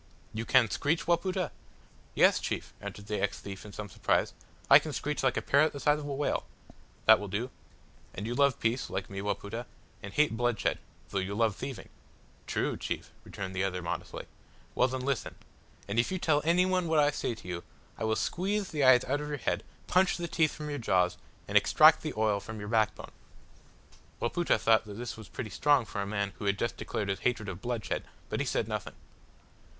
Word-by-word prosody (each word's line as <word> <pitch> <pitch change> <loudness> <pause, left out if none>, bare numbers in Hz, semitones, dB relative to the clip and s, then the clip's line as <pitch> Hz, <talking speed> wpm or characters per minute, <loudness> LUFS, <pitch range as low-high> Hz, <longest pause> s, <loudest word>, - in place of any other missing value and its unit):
"You 110 +1 -3
can 130 -2 +5
screech, 150 - 0
Wapoota?" 180 0 +1 0.6
"Yes, - - +5
chief," - - -4
answered 100 - -7
the 105 -1 -2
ex 100 - -1
thief 100 -1 -8
in 105 - -10
some 105 +1 -6
surprise, 95 - 0 0.3
"I - - +9
can 155 - -6
screech 150 +3 -2
like 130 -2 +2
a - - -1
parrot 145 +3 +4
the 140 - -6
size 150 +1 +3
of 145 - -6
a - - -4
whale." 145 +1 -1 0.6
"That 110 0 +8
will 105 - -5
do. 110 +7 -3 0.6
And 100 - -4
you 120 - -2
love 140 0 +3
peace, 115 +3 0
like 95 +1 -4
me, 100 0 -4
Wapoota, 105 +3 -3 0.3
and 100 - -7
hate 150 -1 +2
bloodshed, 120 -1 0 0.3
though 100 - -1
you 95 +2 -3
love 110 -2 +2
thieving." 135 +1 -6 0.6
"True, - - -1
chief," - - -4
returned 95 -1 -6
the 95 - +1
other, 90 -2 -2
modestly. 85 - -4 0.5
"Well - - +3
then, 130 0 -3
listen 135 -1 -2 0.5
and 100 +3 0
if 115 - +2
you 185 - 0
tell 155 -4 +2
any 170 +3 +4
one 185 -2 +1
what 160 -1 +2
I 145 -1 +5
say 120 - -2
to 100 - -13
you, 85 -1 -4 0.3
I - - -6
will 110 0 +2
squeeze 195 - -1
the 150 -3 0
eyes 130 -1 +7
out 145 +3 -1
of 150 - -4
your 145 -1 -3
head, - - -1 0.2
punch 185 +1 +3
the 175 -1 -3
teeth 160 -3 +2
from 150 -1 -5
your 145 - -3
jaws, 90 -5 +2 0.3
and - - -5
extract - - +7
the - - -4
oil 110 -2 +2
from 110 +2 -8
your 105 0 -6
backbone." 110 -2 0 1.1
Wapoota 170 +7 +1
thought 110 +1 +4
that 105 -1 -8
this 120 +2 -5
was 110 -2 -11
pretty 110 -4 -6
strong 140 +4 +3
for 100 0 -4
a 100 - -3
man 100 -1 -2
who - - -5
had 100 0 +2
just 115 - -1
declared 105 - -3
his 95 - -1
hatred 115 -4 0
of 95 0 -6
bloodshed, 120 -3 -2 0.3
but - - -2
he - - -1
said - - 0
nothing. - - -4
115 Hz, 210 wpm, -30 LUFS, 100-145 Hz, 1.1 s, I